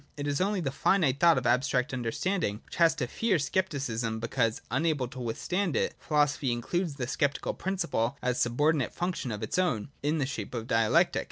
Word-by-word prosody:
It 145 - -3
is 145 +1 0
only 200 0 +1
the 135 -5 -1
finite 140 -2 +2
thought 170 -3 +6
of 125 - -1
abstract 125 +2 +1
understand 140 - -1
ing 105 +1 -2
which - - -10
has 165 -2 +5
to 145 -6 -1
fear 200 - +1
Scepticism, 135 -8 -1
because 115 0 0
unable 140 -1 +1
to 130 +1 -10
with 115 -2 -3
stand 180 -2 -1
it: - - +1
philosophy 145 -3 +1
includes 155 +7 -2
the 130 -3 -3
sceptical 140 +2 -1
principle 170 -10 -1
as 125 0 -1
a - - 0
subordinate 145 +3 +1
function 175 -8 -2
of 105 0 -4
its 110 - -1
own, 140 - 0
in 150 +3 0
the 140 - +1
shape 135 -2 -5
of 115 -1 -3
Dialectic. 115 -1 +3
140 Hz, 200 wpm, -29 LUFS, 120-165 Hz, -, thought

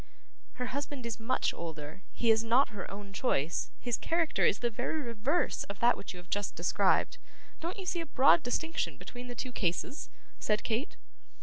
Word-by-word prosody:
'Her 250 - -3
husband 280 -1 -4
is 230 -2 -3
much 240 +3 +1
older; 155 0 -6
he 230 -1 +3
is 220 0 +4
not 240 +5 +4
her 205 -3 -6
own 200 0 -8
choice; 170 - 0
his 240 -2 -1
character 330 -1 +1
is - - +5
the 240 +2 0
very 245 +7 -1
reverse 245 +5 0
of 200 -1 -7
that 240 +1 +5
which - - -7
you 180 - -9
have 180 0 -13
just 205 -1 -1
described. 180 +3 +2 0.4
Don't 340 +3 -4
you 385 - -5
see 355 -1 0
a 330 - -6
broad 280 +4 +6
destinction 320 +6 -1
between 245 0 -8
the 245 - -6
two 255 +2 -4
cases?' 195 - -1 0.3
said 210 0 +1
Kate. 235 +7 -1
235 Hz, 190 wpm, -32 LUFS, 200-275 Hz, 0.4 s, broad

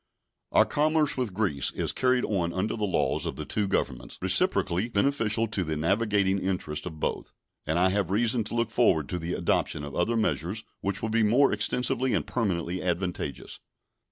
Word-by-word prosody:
Our - - +5
commerce 155 0 +2
with 125 -8 -3
Greece 90 -10 0
is - - 0
carried 125 -1 +1
on 85 -5 -1
under 95 +4 -1
the 105 -2 -1
laws 95 - 0
of - - -4
the - - -6
two 105 -2 -1
Governments, - - -2
reciprocally 95 +7 +2
beneficial 115 -1 +1
to 100 -4 -1
the 80 -2 -3
navigating 100 +3 +1
interests 90 -5 -3
of 80 -3 -8
both; - - -3 0.3
and 80 - +1
I 90 +2 +4
have 95 -2 0
reason 115 +3 +2
to 110 - -5
look 115 -1 0
forward 90 - +2
to 90 - -2
the 85 +1 -4
adoption 75 - 0
of 70 -1 -7
other 115 +7 0
measures 105 -1 -1 0.2
which 100 +2 -3
will 110 - -1
be 115 +1 +2
more 120 +5 +4
extensively 125 +4 0
and - - -1
permanently 90 -6 -2
advantageous. 90 0 -3
100 Hz, 185 wpm, -27 LUFS, 90-115 Hz, 0.3 s, Our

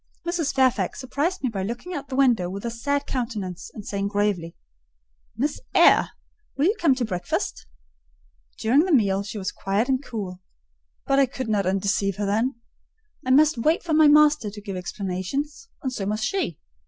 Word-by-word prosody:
Mrs. 340 -4 -1
Fairfax 255 -8 +2
surprised 285 +8 -2
me 255 - +1
by 200 -4 -4
looking 240 - -5
out 285 -5 -4
of - - -34
the 260 - -3
window 245 -10 +3
with 200 +4 -6
a 235 - -2
sad 285 +5 -1
countenance, 220 -8 -4
and 210 - -8
saying 200 0 -2
gravely—"Miss 165 - -4 0.2
Eyre, - - +6 0.5
will 280 - +2
you 405 +5 +3
come 300 -6 +4
to 255 -2 -1
breakfast?" 180 -4 -3 0.9
During 265 +9 +3
the 375 - -1
meal 200 -5 +2
she 200 +2 -6
was 190 -2 -3
quiet 200 +4 -1
and 265 +1 +1
cool: 190 -7 -6 0.6
but 275 0 +3
I 275 - +5
could 260 -1 -5
not 200 -3 +1
undeceive 195 0 0
her 205 0 -2
then. 225 +7 0 0.7
I 255 - -4
must 295 0 +5
wait 310 +8 +2
for 330 - -2
my 310 0 +6
master 300 -5 +5
to 210 +1 -9
give 200 -2 -6
explanations; 195 - -4
and 260 -2 -2
so 195 -5 -3
must 215 +1 -1
she. 305 - -1
225 Hz, 180 wpm, -24 LUFS, 195-280 Hz, 0.9 s, Eyre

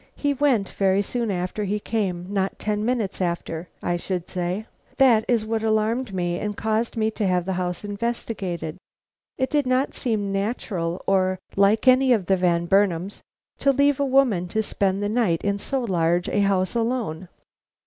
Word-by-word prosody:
He 285 -1 0
went 260 -8 +2
very 195 0 +1
soon 235 +2 -2
after 185 +2 -2
he 205 +1 -1
came, 195 -5 -2
not 195 -1 -1
ten 210 0 -2
minutes 220 -5 -1
after, 170 -1 -3
I 175 0 0
should 180 0 -4
say. 180 +3 -3 0.3
That 240 -5 +5
is 230 -3 +1
what 225 0 -1
alarmed 220 +2 0
me 175 -2 -1
and 210 -1 -4
caused 220 +2 -1
me 220 0 +1
to 215 -2 -1
have 180 -1 +1
the 190 - -1
house 180 0 -3
investigated. 200 -6 -3 0.6
It 260 0 -1
did 290 -3 +1
not 255 +2 +1
seem 215 -5 -1
natural 195 -4 -2
or 185 -1 +2 0.2
like 205 +5 +3
any 255 0 +6
of 210 -6 0
the 190 - +3
Van 170 -2 +1
Burnams 195 0 +1 0.4
to 275 - +4
leave 280 +1 +2
a - - +2
woman 255 -10 +2
to 220 +5 -1
spend 195 -1 0
the - - +1
night 210 -7 +1
in 200 0 0
so 270 +5 -2
large 175 -5 +1
a - - 0
house 195 -2 +2
alone." 225 -8 -2
205 Hz, 180 wpm, -24 LUFS, 185-230 Hz, 0.6 s, any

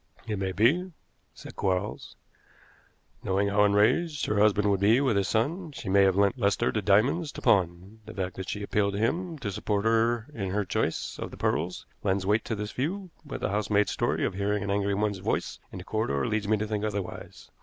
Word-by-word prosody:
"It 105 -3 -3
may 95 -1 -1
be," 160 - +2 0.4
said - - -11
Quarles. 95 +2 -2 1.1
"Knowing 100 +1 +1
how 100 +1 +3
enraged 140 +10 +2
her 105 - 0
husband 105 -1 +3
would 100 - +1
be 110 +5 +4
with 135 -6 +2
his 100 -1 +1
son, 155 - -1
she 110 - -6
may 100 +1 +5
have 95 -1 +3
lent 100 +5 +2
Lester 100 +2 +2
the 110 - -1
diamonds 125 - +2
to - - -8
pawn. 95 -1 +1
The 110 - -8
fact 90 -2 -3
that 95 - -5
she 105 - -4
appealed 100 0 0
to 100 - -2
him 165 +9 -1
to 110 -8 -4
support 100 +2 -1
her 115 0 +2
in 100 -7 -3
her 100 +2 -1
choice 90 - -2
of - - -4
the - - -11
pearls 85 +3 -1 0.2
lends 95 -1 0
weight 105 +3 +2
to 115 - -2
this 105 0 -4
view, 180 +7 -3
but 150 - -7
the - - 0
housemaid's 105 0 +1
story - - 0
of - - -1
hearing 100 +1 -1
an 100 - -2
angry 100 0 +1
woman's 105 -1 -1
voice - - -2
in - - -8
the 90 - -7
corridor 70 -11 -1
leads 105 -1 -1
me 110 +1 +3
to 105 - -2
think 105 -1 -3
otherwise. 100 -3 -5
105 Hz, 215 wpm, -27 LUFS, 100-115 Hz, 1.1 s, may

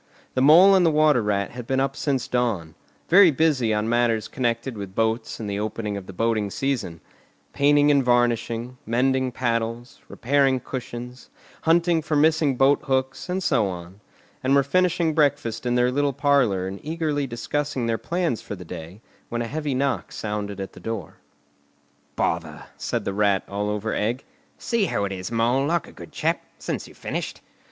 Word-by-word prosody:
The 130 - 0
Mole 170 +8 +8
and 190 -2 +5
the 165 - +5
Water 150 -4 +4
Rat 100 -2 -1
had 120 -1 -8
been 130 0 +1
up 135 +1 0
since 135 -3 -1
dawn, 110 -11 -1 0.3
very 185 +1 +7
busy 145 -6 +2
on 105 0 0
matters 115 -2 +1
connected 120 0 -2
with 100 -2 -7
boats 110 +1 -1
and 110 - -5
the 100 0 -2
opening 105 0 -3
of 100 -2 -7
the - - -7
boating 110 +1 0
season; 115 -9 -3 0.5
painting 145 +1 +4
and 140 -2 +3
varnishing, 120 0 0
mending 130 +2 +1
paddles, 115 0 -2
repairing 135 0 +1
cushions, 125 0 -7 0.3
hunting 170 0 +3
for 155 0 -2
missing 150 -2 +3
boat 135 +2 +4
hooks, 130 +3 -1
and 185 +1 -1
so 120 - +2
on; 90 +1 -8 0.4
and 135 +2 +3
were 140 - +5
finishing 175 +2 +1
breakfast 125 -6 0
in 120 - +1
their 125 0 +3
little 140 +1 +1
parlour 140 -9 +2
and 95 +1 -5
eagerly 155 -3 -2
discussing 135 +2 -2
their 115 -1 0
plans 170 -8 -1
for - - -6
the 90 -2 -10
day, 85 +4 -9 0.3
when 120 0 -2
a - - -4
heavy 150 0 -2
knock 135 0 -1
sounded 105 -2 -4
at 95 - -6
the - - -12
door. 115 -2 -6 1.0
"Bother!" 80 -1 -2
said - - -3
the 100 - -2
Rat, 100 -1 +2
all 105 +1 -2
over 105 +1 -2
egg. 120 +5 -1 0.3
"See 230 -5 0
who 100 - -1
it 100 - -4
is, 95 +2 -5
Mole, 120 +4 +2
like 170 0 0
a - - -12
good - - -12
chap, - - -1 0.2
since - - -4
you've - - -16
finished." - - -5
125 Hz, 180 wpm, -24 LUFS, 105-145 Hz, 1.0 s, Mole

